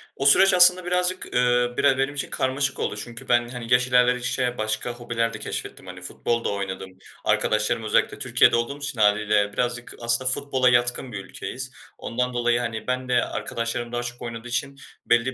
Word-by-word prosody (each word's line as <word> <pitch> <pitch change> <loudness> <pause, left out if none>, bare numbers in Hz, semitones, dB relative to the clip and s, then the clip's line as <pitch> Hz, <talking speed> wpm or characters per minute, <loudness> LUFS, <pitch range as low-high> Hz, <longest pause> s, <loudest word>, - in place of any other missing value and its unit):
O 135 - -3
süreç 190 +8 +6
aslında 180 0 +5
birazcık, 180 +1 0
eee, 125 0 +2
bire 140 -2 +3
benim 135 +1 0
için 140 - -4
karmaşık 130 +1 -1
oldu. - - -2
Çünkü 120 +4 -8
ben, 120 0 +3
hani, 120 -1 -3
yaş 125 +1 +4
ilerledikçe 125 0 +1
başka 110 +2 -2
hobiler 115 -1 -2
de - - -7
keşfettim - - -6
hani. - - -9
Futbol 115 0 -2
da - - 0
oynadım. 95 -2 -5 0.3
Arkadaşlarım, 105 +1 +1
özellikle 110 - +1
Türkiye'de - - +4
olduğum 120 +4 -1
için 145 -5 -5
hâliyle 105 0 +3
birazcık 120 +1 -2
aslında 120 +2 +1
futbola 130 -1 +1
yatkın 120 +1 +1
bir 100 -3 -6
ülkeyiz. 130 +1 -7 0.3
Ondan 125 +1 -2
dolayı, 120 0 +1
hani, 115 -1 -4
ben 130 0 -2
de 125 -1 +3
arkadaşlarım 120 +1 -4
daha 120 0 -2
çok 120 0 -7
oynadığı 115 0 -6
için 140 +3 -3 0.3
belli 120 0 +3
120 Hz, 180 wpm, -24 LUFS, 115-130 Hz, 0.3 s, süreç